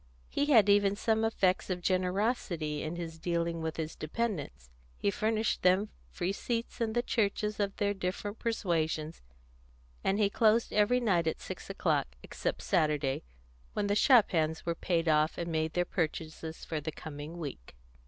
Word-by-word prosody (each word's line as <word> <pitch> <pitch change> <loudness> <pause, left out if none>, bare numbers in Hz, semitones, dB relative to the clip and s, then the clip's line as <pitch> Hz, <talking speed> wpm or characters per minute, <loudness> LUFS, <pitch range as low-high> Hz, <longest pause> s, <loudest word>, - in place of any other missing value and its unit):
He 285 - 0
had 225 -9 +6
even 200 0 +4
some 220 +1 +1
effects 195 -5 +1
of 180 -1 -1
generosity 180 -4 0
in 155 +2 -3
his 165 -2 -6
dealing 170 0 -1
with 160 0 -3
his 160 0 -3
dependants; 155 - -3 0.3
he 200 - +1
furnished 220 +2 0
them 185 +3 +3 0.2
free 180 +1 -2
seats 235 +2 -3
in 225 -1 0
the 240 +1 +1
churches 210 -2 0
of 200 -1 0
their 205 0 +1
different 195 +2 -4
persuasions, 165 -8 -1 0.8
and 195 - +2
he 210 -1 +4
closed 220 +2 +3
every 215 +4 +4
night 180 -9 +2
at 160 - -1
six - - -8
o'clock, - - 0
except - - -3
Saturday, 150 -3 +1 0.5
when - - 0
the 200 - +1
shop 240 0 +6
hands 160 -2 0
were 170 - +1
paid 165 0 0
off, 155 0 +3
and 170 -1 -3
made 160 0 0
their 175 0 +1
purchases 160 -1 -3
for 155 -2 -3
the 155 +2 -4
coming 150 +2 -8
week. 140 - -7
180 Hz, 165 wpm, -31 LUFS, 160-210 Hz, 0.8 s, had